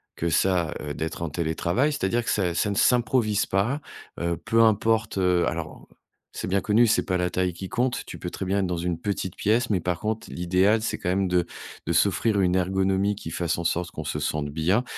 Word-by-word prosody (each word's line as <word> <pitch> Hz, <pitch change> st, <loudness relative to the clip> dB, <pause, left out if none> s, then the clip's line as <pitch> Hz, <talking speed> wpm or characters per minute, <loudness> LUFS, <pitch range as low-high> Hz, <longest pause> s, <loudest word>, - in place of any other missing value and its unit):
que 85 Hz, -, -1 dB
ça, 85 Hz, 0 st, +2 dB
heu, 75 Hz, -1 st, -4 dB
d'être 80 Hz, +3 st, -4 dB
en 85 Hz, -, -2 dB
télétravail. 85 Hz, -, 0 dB
C'est-à-dire 120 Hz, -3 st, 0 dB
que -, -, -3 dB
ça, 90 Hz, -4 st, +1 dB
ça 85 Hz, +4 st, 0 dB
ne 100 Hz, -, -2 dB
s'improvise 115 Hz, -3 st, +2 dB
pas, 110 Hz, +10 st, 0 dB, 0.4 s
heu, 85 Hz, -1 st, -1 dB
peu 115 Hz, +4 st, +2 dB
importe, 110 Hz, -1 st, +2 dB
heu 90 Hz, -2 st, +2 dB
alors, 80 Hz, -2 st, -5 dB, 0.5 s
c'est -, -, -3 dB
bien 100 Hz, +1 st, +2 dB
connu, 110 Hz, +4 st, +4 dB
c'est 115 Hz, -, +2 dB
pas 90 Hz, -, -1 dB
la 90 Hz, 0 st, 0 dB
taille 90 Hz, 0 st, 0 dB
qui 95 Hz, +2 st, -7 dB
compte. 125 Hz, +1 st, -1 dB
Tu -, -, -9 dB
peux -, -, -4 dB
très -, -, -6 dB
bien 95 Hz, +2 st, +1 dB
être 95 Hz, -, 0 dB
dans 90 Hz, -, -1 dB
une 85 Hz, 0 st, -2 dB
petite 95 Hz, -1 st, -3 dB
pièce, 115 Hz, +4 st, +1 dB
mais, 100 Hz, -4 st, +2 dB
par 90 Hz, 0 st, -2 dB
contre, 110 Hz, +1 st, -2 dB
l'idéal, 95 Hz, +5 st, +2 dB
c'est 110 Hz, -, -2 dB
quand -, -, -6 dB
même 95 Hz, 0 st, +1 dB
de 90 Hz, -1 st, +2 dB, 0.4 s
de 85 Hz, -, 0 dB
s'offrir 100 Hz, +4 st, +2 dB
une 90 Hz, -1 st, +2 dB
ergonomie 95 Hz, +2 st, +1 dB
qui 80 Hz, -5 st, -7 dB
fasse 85 Hz, +1 st, -1 dB
en 85 Hz, -, -3 dB
sorte 85 Hz, +1 st, -1 dB
qu'on 80 Hz, -, -6 dB
se 75 Hz, 0 st, -3 dB
sente 75 Hz, 0 st, -2 dB
bien, 85 Hz, +10 st, +1 dB
95 Hz, 225 wpm, -25 LUFS, 85-105 Hz, 0.5 s, connu